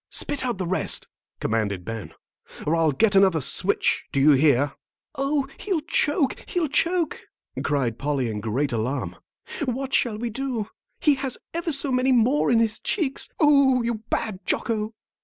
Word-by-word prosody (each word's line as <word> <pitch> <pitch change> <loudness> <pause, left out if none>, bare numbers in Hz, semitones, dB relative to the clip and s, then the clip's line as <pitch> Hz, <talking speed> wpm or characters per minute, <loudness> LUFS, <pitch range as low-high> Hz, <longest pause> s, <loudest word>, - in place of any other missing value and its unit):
"Spit 285 - 0
out 245 -5 -2
the 185 - -3
rest," 180 +2 +1 0.3
commanded 100 -5 -1
Ben, 110 -7 -6 0.5
"or 155 - +2
I'll 165 -2 +3
get 205 +8 +2
another 190 -4 +5
switch. 140 - +1
Do 140 - +1
you 145 +3 +6
hear?" 140 -1 +3 0.4
"Oh, 275 -1 -1
he'll 375 -6 -1
choke, 295 -2 0
he'll 345 -5 0
choke," 335 +3 +1 0.4
cried 130 -6 -1
Polly, 140 -3 -1
in 110 -2 -3
great 125 +7 -1
alarm. 120 +5 -2 0.5
"What 265 +2 -3
shall 225 -4 +2
we 235 +1 -3
do? 240 -3 -3 0.3
He 300 - +4
has 265 -3 0 0.2
ever 335 0 -2
so 280 -1 +2
many 255 +1 +2
more 250 +5 +3
in 240 - +4
his 225 -1 +1
cheeks. 315 -10 -1
Oh, 275 -5 +4
you 230 -2 -2
bad 215 -5 -2
Jocko!" 220 -1 -1
225 Hz, 160 wpm, -24 LUFS, -, 0.5 s, you